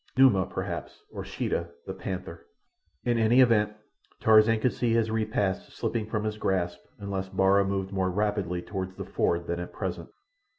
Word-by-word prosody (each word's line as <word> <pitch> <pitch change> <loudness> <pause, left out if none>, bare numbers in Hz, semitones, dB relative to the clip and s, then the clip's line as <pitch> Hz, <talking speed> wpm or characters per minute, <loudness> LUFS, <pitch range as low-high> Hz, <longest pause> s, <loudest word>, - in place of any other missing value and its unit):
Numa, 105 -9 +5
perhaps, 95 - -5
or - - -6
Sheeta, - - -2 0.2
the - - -4
panther. - - -6 0.6
In 120 -1 +2
any 115 +3 +4
event, 110 -4 +4 0.5
Tarzan 110 0 +5
could 125 +2 +1
see 120 -2 0
his 115 -1 +2
repast 110 -3 -1
slipping 110 -2 -2
from 110 -1 -2
his 105 0 -3
grasp 90 -3 0 0.2
unless 100 -2 -4
Bara 95 +1 +4
moved 95 -1 -2
more 95 -1 +1
rapidly 95 -3 -1
toward 95 -1 -5
the - - -5
ford 85 0 0
than 85 0 -2
at 90 - -6
present. - - -4
100 Hz, 165 wpm, -28 LUFS, 95-110 Hz, 0.6 s, Numa